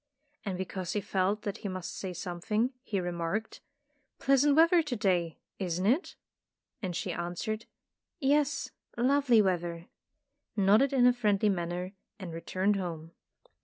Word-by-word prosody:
And 195 Hz, -5 st, -3 dB
because 185 Hz, -1 st, -4 dB
he 210 Hz, -, +1 dB
felt 200 Hz, +1 st, 0 dB
that 205 Hz, +1 st, -3 dB
he -, -, -4 dB
must 185 Hz, -2 st, -5 dB
say 190 Hz, -, -4 dB
something, 185 Hz, +8 st, -1 dB
he 210 Hz, -7 st, -2 dB
remarked, 175 Hz, +4 st, -3 dB, 0.3 s
" 290 Hz, -2 st, -45 dB
Pleasant 275 Hz, +1 st, +4 dB
weather 335 Hz, +2 st, +6 dB
to 295 Hz, -6 st, -3 dB
day, 180 Hz, -7 st, +1 dB, 0.2 s
isn't 180 Hz, -1 st, -1 dB
it?" 265 Hz, -, +1 dB, 0.7 s
And 185 Hz, -4 st, -3 dB
she 180 Hz, 0 st, -2 dB
answered: 175 Hz, +6 st, -3 dB, 0.5 s
''Yes, 285 Hz, 0 st, +1 dB, 0.3 s
lovely 250 Hz, -2 st, +4 dB
weather," 175 Hz, -2 st, -2 dB, 0.7 s
nodded 210 Hz, +6 st, +4 dB
in 260 Hz, -3 st, +4 dB
a 250 Hz, -, +7 dB
friendly 210 Hz, -3 st, +2 dB
manner 180 Hz, 0 st, -2 dB, 0.2 s
and 185 Hz, -5 st, -7 dB
returned 190 Hz, +4 st, 0 dB
home. 165 Hz, -3 st, -5 dB
200 Hz, 140 wpm, -30 LUFS, 180-245 Hz, 0.7 s, a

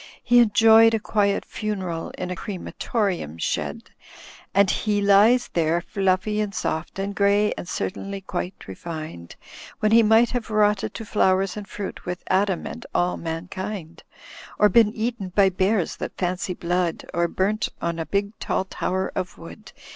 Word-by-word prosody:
He 245 Hz, 0 st, +5 dB
enjoyed 225 Hz, 0 st, +6 dB
a -, -, 0 dB
quiet 205 Hz, -1 st, 0 dB
funeral 190 Hz, -6 st, -4 dB
in 180 Hz, 0 st, -4 dB
a -, -, -2 dB
crematorium 185 Hz, -, -3 dB
shed, -, -, -3 dB, 0.6 s
And 200 Hz, -1 st, +4 dB
he 210 Hz, -1 st, 0 dB
lies 205 Hz, +5 st, +5 dB
there 165 Hz, 0 st, +2 dB
fluffy 195 Hz, +3 st, 0 dB
and 205 Hz, -2 st, -3 dB
soft 160 Hz, +4 st, -3 dB
and 195 Hz, +1 st, -3 dB
grey 200 Hz, +1 st, +3 dB
and 175 Hz, -, -7 dB
certainly 195 Hz, +1 st, -4 dB
quite 180 Hz, 0 st, -4 dB
refined. 155 Hz, -, -7 dB, 0.4 s
When 215 Hz, -, +2 dB
he 230 Hz, +1 st, +7 dB
might 225 Hz, +2 st, +4 dB
have 245 Hz, -3 st, -3 dB
rotted 210 Hz, -2 st, +1 dB
to 225 Hz, -, -6 dB
flowers 190 Hz, -2 st, +2 dB
and 210 Hz, -1 st, -7 dB
fruit 205 Hz, -2 st, -6 dB
with 180 Hz, 0 st, -5 dB
Adam 190 Hz, -2 st, +1 dB
and -, -, -7 dB
all 180 Hz, 0 st, +2 dB
mankind. 175 Hz, +1 st, -6 dB, 0.6 s
Or 210 Hz, -, +5 dB
been 225 Hz, -2 st, +5 dB
eaten 225 Hz, -3 st, -3 dB
by 200 Hz, -2 st, +5 dB
bears 190 Hz, 0 st, 0 dB
that -, -, -6 dB
fancy 180 Hz, 0 st, -2 dB
blood. 175 Hz, -1 st, -1 dB
Or 170 Hz, +1 st, +1 dB
burnt 200 Hz, +5 st, 0 dB
on 170 Hz, 0 st, -2 dB
a 165 Hz, -, -2 dB
big 200 Hz, 0 st, 0 dB
tall 190 Hz, -, -1 dB
tower 190 Hz, 0 st, -2 dB
of 185 Hz, -2 st, -4 dB
wood. 210 Hz, +6 st, -12 dB
195 Hz, 160 wpm, -24 LUFS, 180-210 Hz, 0.6 s, he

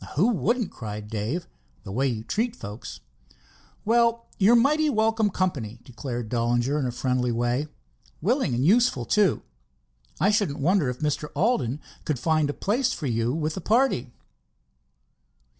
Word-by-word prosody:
"Who 185 Hz, +11 st, +4 dB
wouldn't!" 230 Hz, -, 0 dB
cried 105 Hz, -2 st, -7 dB
Dave—"the 105 Hz, -, -6 dB
way 130 Hz, +7 st, +1 dB
you 115 Hz, -4 st, -2 dB
treat 225 Hz, -, -1 dB
folks." 105 Hz, -, -8 dB, 0.8 s
"Well, 235 Hz, +1 st, +3 dB
you're 210 Hz, +4 st, +6 dB
mighty 300 Hz, +6 st, +3 dB
welcome 220 Hz, -3 st, +2 dB
company," 140 Hz, -, -2 dB
declared 120 Hz, -1 st, -5 dB
Dollinger 120 Hz, +4 st, +1 dB
in 135 Hz, -, 0 dB
a -, -, -2 dB
friendly 125 Hz, 0 st, 0 dB
way. 120 Hz, +5 st, 0 dB, 0.5 s
"Willing 215 Hz, -, +1 dB
and 125 Hz, +3 st, +1 dB
useful, 205 Hz, -, +3 dB
too. 205 Hz, -, +2 dB, 0.8 s
I 200 Hz, -, +4 dB
shouldn't 205 Hz, -9 st, +1 dB
wonder 165 Hz, -1 st, +2 dB
if 125 Hz, +2 st, -5 dB
Mr. 150 Hz, 0 st, -1 dB
Alden 150 Hz, -, +1 dB, 0.2 s
could 150 Hz, -4 st, -1 dB
find 155 Hz, +2 st, +1 dB
a -, -, -1 dB
place 245 Hz, +6 st, 0 dB
for 155 Hz, -, -5 dB
you 115 Hz, -1 st, 0 dB
with 155 Hz, +2 st, -1 dB
the 190 Hz, -, -5 dB
party." 215 Hz, -, +1 dB
150 Hz, 145 wpm, -25 LUFS, -, 0.8 s, you're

